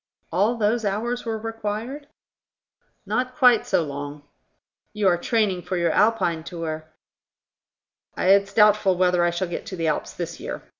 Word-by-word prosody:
"All 205 +8 +2
those 225 +1 +1
hours 230 +5 -2
were 225 -1 -2
required?" 225 +5 -5 1.0
"Not 255 0 -2
quite 250 -5 +4
so 170 - +2
long." 145 0 -6 0.7
"You 210 -2 +1
are 180 - +5
training 210 -4 0
for 180 +1 -3
your 170 -1 +1
Alpine 190 -7 +2
tour." 160 -2 -5 1.3
"It's 195 +1 +3
doubtful 210 -3 +4
whether 180 -1 +3
I 175 - +3
shall 175 +2 -2
get 170 - -6
to 185 - -5
the 165 -2 -3
Alps 150 - -2
this - - -6
year. - - -6
200 Hz, 150 wpm, -23 LUFS, 175-225 Hz, 1.3 s, are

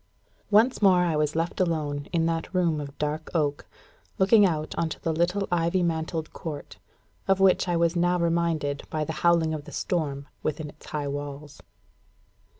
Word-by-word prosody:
_ - - -40 0.5
Once 220 +5 +4
more 185 -3 +5
I 170 -3 +1
was 150 0 0
left 165 +4 -1
alone 150 -5 -1
in 165 -2 +1
that 165 0 -2
room 170 -4 +2
of 140 -1 -9
dark 150 +1 -3
oak, 145 -3 0 0.5
looking 200 +1 +6
out 155 -3 -2
on 165 - 0
the 165 - 0
little 180 +5 0
ivy 175 +1 +1
mantled 160 -1 -2
court, 145 -10 -7 0.5
of 195 0 +3
which 190 -1 +4
I 175 -1 +1
was 170 +1 +2
now 175 +1 +2
reminded 165 -4 0
by 155 -1 -2
the 160 - -4
howling 170 -2 +3
of 150 -2 -5
the - - -10
storm 145 -5 -2
within 155 0 -3
its 150 - -16
high 150 -2 -3
walls. 145 +1 -6
165 Hz, 175 wpm, -26 LUFS, 150-175 Hz, 0.5 s, looking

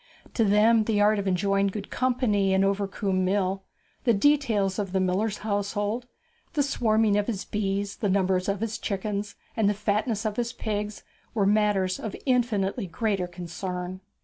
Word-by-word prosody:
To 230 - +2
them 215 +2 +4
the 215 -2 +1
art 210 0 +4
of 200 - -3
enjoying 195 +2 +2
good 200 +1 -5
company 240 -7 +1
in 190 - +3
Overcombe 195 -1 0
Mill, 190 0 0 0.4
the 235 -4 +3
details 215 -7 +2
of 195 -2 -3
the 190 - +2
miller's 195 +3 0
household, 205 +3 -1 0.5
the 295 -3 +2
swarming 220 -6 +2
of 205 - -2
his 195 -6 -3
bees, 200 -1 -2
the 205 - -1
number 190 -1 +2
of 195 +2 -2
his 225 -1 -2
chickens, 205 +1 -3 0.2
and 220 -3 +3
the 205 - 0
fatness 210 +2 -1
of 215 -1 -2
his 240 0 -1
pigs, 210 -2 -4 0.3
were 205 -3 +2
matters 200 -3 +2
of 220 - -5
infinitely 235 -5 +1
greater 195 +1 -1
concern. 180 +1 -5
205 Hz, 165 wpm, -26 LUFS, 195-220 Hz, 0.5 s, them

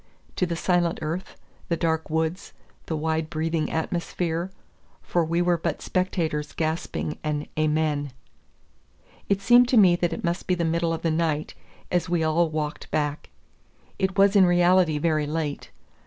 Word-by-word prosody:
to 180 - 0
the 170 - -2
silent 175 0 +1
earth, 165 +5 -4 0.3
the 170 - +1
dark 160 -1 -1
woods, 160 +4 -2 0.3
the 160 - -2
wide 160 0 -1
breathing 160 -1 -1
atmosphere; 170 +1 -2 0.5
for 175 - +1
we 170 +2 0
were 175 -1 +2
but - - -2
spectators 160 -5 -1
gasping 160 -1 -3
an 150 -1 -2
Amen! 150 -2 0 1.2
It 200 0 +1
seemed 245 +2 +6
to 250 - +3
me 185 -5 +7
that 175 -1 0
it - - -5
must 170 +1 -2
be 185 - +2
the 170 -1 -1
middle 165 +1 0
of 165 - -3
the 165 - +1
night, 155 -2 -1 0.4
as 180 0 0
we 175 -2 +1
all 160 +1 +2
walked 155 0 -4
back. 150 -1 -2 0.7
It 190 +1 -1
was 200 +1 +5
in 190 -2 +7
reality 175 -2 +4
very 155 -1 +1
late. 150 -2 -3
Dr. - - -36
165 Hz, 165 wpm, -25 LUFS, 155-175 Hz, 1.2 s, me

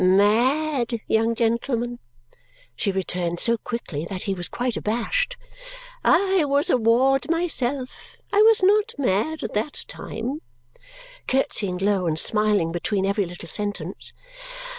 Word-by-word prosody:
Mad, 235 +7 +2
young 225 +1 +1
gentleman," 235 +1 -1 0.8
she 200 - 0
returned 180 -2 -2
so 235 - +3
quickly 220 -10 -5
that 185 -2 -4
he 195 - -1
was 175 -2 -2
quite 245 -2 -2
abashed. - - -1 0.7
"I 385 -2 +3
was 285 0 +1
a - - +4
ward 255 +5 +2
myself. 280 -6 -2 0.2
I 410 - +5
was 440 -2 +5
not 420 +4 +3
mad 275 +5 0
at - - -4
that 220 +8 -2
time," 255 +7 -5 0.9
curtsying 205 -8 0
low 195 -1 +1
and 155 -1 0
smiling 210 -3 +3
between 190 +3 -1
every 200 -1 0
little 175 0 -9
sentence. 195 -2 -2
230 Hz, 130 wpm, -23 LUFS, 195-275 Hz, 0.9 s, I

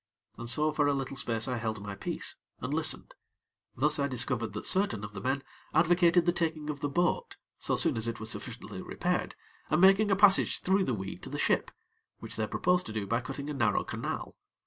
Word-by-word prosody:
And 120 +1 -6
so 155 +4 +3
for 150 -1 +1
a 145 - +2
little 135 0 -4
space 115 -4 0
I 125 -2 -1
held 110 -2 -3
my 100 0 -6
peace, 100 - -2 0.2
and - - -4
listened; - - 0 0.6
thus 150 +4 +2
I 140 - +1
discovered 125 -4 0
that 105 - -5
certain 185 - +3
of 105 0 -7
the 95 - -7
men 135 +4 -1 0.3
advocated 175 +1 +4
the 175 - +4
taking 160 -3 -2
of 145 - -8
the 145 0 -2
boat 175 +5 0 0.2
so - - 0
soon - - +5
as 115 0 -1
it 115 -1 -4
was 110 0 -3
sufficiently - - -6
repaired - - -2 0.3
and 155 - +2
making 195 +3 +5
a 195 - +4
passage 200 0 +5
through 190 +1 +2
the 125 - -1
weed 95 -2 -6
to - - -8
the - - -5
ship, - - +1 0.5
which - - -8
they 110 -1 -1
proposed 180 +7 +1
to 110 - -6
do 105 -2 -2
by 115 +5 0
cutting 140 +3 -6
a 150 - -3
narrow 120 -7 +1
canal. - - -5
140 Hz, 215 wpm, -30 LUFS, 110-170 Hz, 0.6 s, soon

